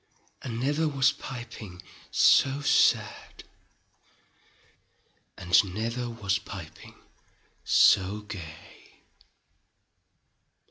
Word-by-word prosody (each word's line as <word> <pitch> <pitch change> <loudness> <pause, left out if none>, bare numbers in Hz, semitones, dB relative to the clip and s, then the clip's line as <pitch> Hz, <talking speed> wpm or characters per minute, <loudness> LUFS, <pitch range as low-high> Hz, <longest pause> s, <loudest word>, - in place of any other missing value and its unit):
And 115 -2 -6
never 145 +5 0
was 140 -2 +2
piping 115 -7 -10 0.3
so 140 +1 +3
sad, 145 - +1 1.9
And 90 +1 +2
never 115 +3 -3
was 100 -5 -2
piping 95 -5 -11 0.7
so 100 +2 +3
gay. 85 -7 -12
110 Hz, 65 wpm, -27 LUFS, 95-130 Hz, 1.9 s, so